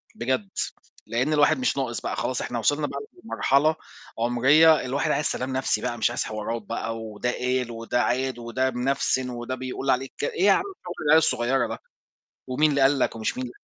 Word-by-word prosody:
بجد، 120 -5 -1 0.6
لإن 125 +7 0
الواحد 150 - +4
مش 255 - 0
ناقص - - -2
بقى - - -3
خلاص - - -2
إحنا - - -3
وصلنا - - +1
بقى - - -5 0.2
لمرحلة 155 -5 +2 0.4
عُمرية 140 +7 +5
الواحد 135 +2 0
عايز 150 - 0
سلام 130 +1 -1
نفْسي 130 0 0
بقى 120 - -3
مش 115 - +2
عايز - - -1
حوارات 110 +2 -4
بقى 115 +2 -4
وده 110 +2 -3
قال 125 -1 -1
وده 115 +2 -1
عاد 130 0 -1
وده 130 +3 -1
منفسِن 130 0 0
وده 120 +1 -4
بيقول 130 +1 -5
عليك 130 +1 0
ك - - -5
إيه 180 +6 0
يا 200 - +7
عم 385 - +3 0.2
شغل 175 0 -6
العيال 155 +2 +7
الصغيّرة 130 -4 +2
ده، 115 - -6 0.7
ومين 150 +4 +2
اللي 140 -1 +1
قال 135 +1 +4
لك 115 - 0
ومش 110 +2 -2
مين 125 -1 -4
130 Hz, 195 wpm, -25 LUFS, 120-140 Hz, 0.7 s, يا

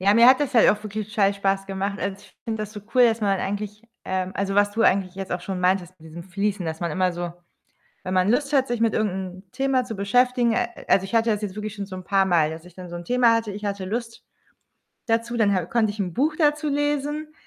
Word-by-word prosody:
Ja, 200 +2 +4
mir 230 +2 +7
hat 260 +2 +7
das 285 -2 -1
halt 230 - +6
auch 210 0 +1
wirklich 215 0 -5
total 200 -2 +2
Spaß 195 0 0
gemacht. 195 +1 -3
Also, 195 +1 -3
ich - - -20
finde 220 -1 -3
das 210 - -8
so 210 - -8
cool, 250 -1 +6
dass 225 -1 +1
man 195 -2 +1
eigentlich, 205 +2 -4 0.2
ähm 185 0 -2
also, 195 0 -2
was 205 0 +4
du 225 +2 -1
eigentlich 185 -2 +2
jetzt 195 -1 -6
auch 180 - -2
schon 185 0 -4
meintest 180 -1 +1
mit 160 - -13
diesem 170 +2 -9
Fließen, 195 0 -2
dass 160 0 -4
man 170 -2 -2
immer 185 +3 +1
so 175 0 -5 0.7
wenn 185 - -3
man 185 +2 +3
Lust 275 +4 +1
hat, 270 -2 +3
sich 240 -1 -2
mit 230 -1 +2
irgend 215 -3 +1
'nem 185 -1 -6
Thema 265 +1 +1
zu 225 -3 -6
beschäftigen 240 +4 +2
a - - +1 0.2
also, 195 - +4
ich 195 - -6
hatte 230 0 +3
das 210 -1 -1
jetzt 200 -1 -4
wirklich 210 0 -5
schon 200 -2 -5
so 190 -1 -8
'n 185 - -8
paarmal, 180 -5 +3
dass 160 +1 -8
ich 180 -1 -15
dann 180 -1 -9
so 175 - -8
'n 175 - -8
Thema 245 +1 +4
hatte. 225 -2 -1
Ich 205 +1 -7
hatte 200 -2 -3
Lust 230 +3 -5 0.8
dazu, 230 0 0
dann 205 -3 +3
ha 185 -3 0
konnte 220 +1 +1
ich 210 - -12
'n 180 -4 -2
Buch 295 - +1
dazu 300 -1 +2
lesen, 295 +1 -1
205 Hz, 260 wpm, -24 LUFS, 185-230 Hz, 0.8 s, mir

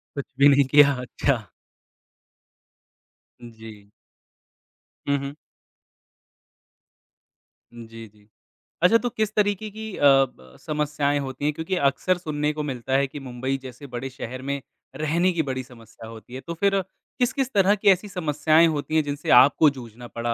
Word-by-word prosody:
कुछ 140 - -4
भी 140 +1 +7
नहीं 140 0 +5
किया, 140 +1 +5
अच्छा। 125 -3 -1 2.0
जी। 110 -3 -13 1.2
हुँ, 140 - +3
हुँ। 140 +1 -6 2.4
उम, 120 -1 -11
जी, 115 0 -11
जी। 105 0 -26 0.5
अच्छा, 220 +6 +6
तो 245 +1 -3
किस 215 -2 -2
तरीके 210 0 0
की 220 +1 -8
अ, - - -4
ब 130 - +2
समस्याएँ 150 -1 -1
होती 135 +1 -5
हैं? 150 - +1
क्योंकि 160 +5 -3
अक्सर 185 +6 -1
सुनने 150 -3 -2
को 150 0 -4
मिलता 130 -2 -4
है 140 0 +1
कि 145 - -9
मुंबई 130 +2 -3
जैसे 130 +3 -11
बड़े 135 +2 -4
शहर 130 -1 -7
में 140 -1 -3 0.3
रहने 170 +4 +1
की 165 - 0
बड़ी 130 -1 -4
समस्या 115 -3 -14
होती 115 +2 -12
है। 130 - -6
तो 170 - -6
फिर 195 +3 +1 0.4
किस-किस 260 +1 0
तरह 200 +1 +4
की 200 - -4
ऐसी 190 +2 +3
समस्याएँ 160 -2 +2
होती 155 0 -3
हैं, 155 - +3
जिनसे 145 +1 -5
आपको 145 +3 +5
जूझना 120 +1 -11
पड़ा 115 0 -3
140 Hz, 155 wpm, -24 LUFS, 125-165 Hz, 2.4 s, भी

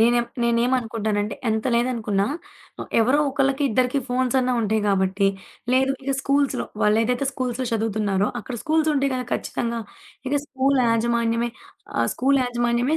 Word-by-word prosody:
నేనెం 240 +1 +4 0.2
నేనేమనుకుంటానంటే 230 -3 0
ఎంత 220 0 0
లేదనుకున్నా 230 -5 0 0.7
ఎవరో 255 +6 +3
ఒకళ్ళకి 275 0 +1
ఇద్దరికి 255 +4 +1
ఫోన్సన్నా 255 0 +1
ఉంటాయి 215 0 +1
కాబట్టి, 195 0 +2 0.5
లేదు 265 +1 +3
ఇక 275 +1 -1
స్కూల్సులో 280 0 +1 0.2
వాళ్ళేదైతే 225 +5 +2
స్కూల్సులో 255 -1 -2
చదువుతున్నారో 210 -3 0
అక్కడ 245 +3 -7
స్కూల్సుంటాయి 305 -4 +1
గదా 255 -1 -2
ఖచ్చితంగా. 235 -1 -2 0.5
ఇక - - -4
స్కూలు 270 0 +1
యాజమాన్యమే 230 0 +1 0.5
ఆహ్, - - +2
స్కూలు 275 +2 +2
యాజమాన్యమే 240 +3 +1
240 Hz, 120 wpm, -23 LUFS, 220-265 Hz, 0.7 s, నేనెం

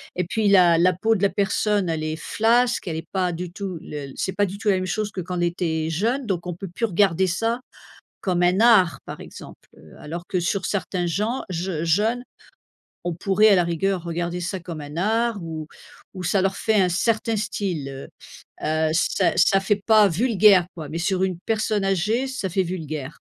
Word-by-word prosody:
et 180 - -1
puis 215 +4 0
la 180 -4 +6
la 180 +2 +4
peau 220 +6 +1
de 195 - -3
la 200 - +4
personne 205 -1 0
elle 160 -1 -2
est 155 0 -2
flasque, 235 +4 +1
elle 160 - -2
est 160 0 -7
pas 185 -2 0
du 175 +1 -5
tout 190 -2 -5
le 145 -2 -7
c'est 190 - -2
pas 205 - +2
du 195 +1 -6
tout 205 +1 -1
la 195 - +4
même 185 0 -2
chose 210 +2 -2
que 190 - -4
quand 180 +1 -5
elle 175 - 0
était 165 -2 -1
jeune. 230 - -1
Donc 180 -5 -3
on 175 - -4
peut 195 +3 -7
plus 185 +7 -2
regarder 190 -2 +2
ça 225 +7 -1 0.6
comme 180 -3 0
un 180 +3 +3
art, 215 -7 +5
par - - -8
exemple, - - -12
heu, 80 - -16
alors 170 +3 -7
que 185 - 0
sur 185 +2 -1
certains 180 -2 -2
gens 210 +9 -1
jeu 175 -2 -3
jeunes, 210 +9 +1 0.8
on 175 -1 -2
pourrait, 200 +4 +3
à 200 - +6
la 180 - +3
rigueur, 175 +2 -1
regarder 175 +1 -3
ça 185 +2 -3
comme 170 -2 -7
un 145 +1 -9
art 220 +3 0
ou 160 -2 -6 0.5
ou 185 -2 -7
ça 190 +3 +2
leur 195 0 0
fait 220 - 0
un 185 -2 +3
certain 220 +5 0
style, 195 -8 -3
heu, 135 0 -8 0.6
heu, 155 0 +1
ça 165 - +2
ça 195 +2 +5
fait 200 +1 0
pas 215 -2 +6
vulgaire, 200 -1 +4
quoi, 160 -3 -7
mais 165 - -4
sur 185 +1 0
une 185 -3 -1
personne 215 -2 0
âgée, 210 +7 0
ça 260 -8 -3
fait 190 +3 +1
vulgaire. 155 -5 -5
185 Hz, 210 wpm, -23 LUFS, 170-210 Hz, 0.8 s, la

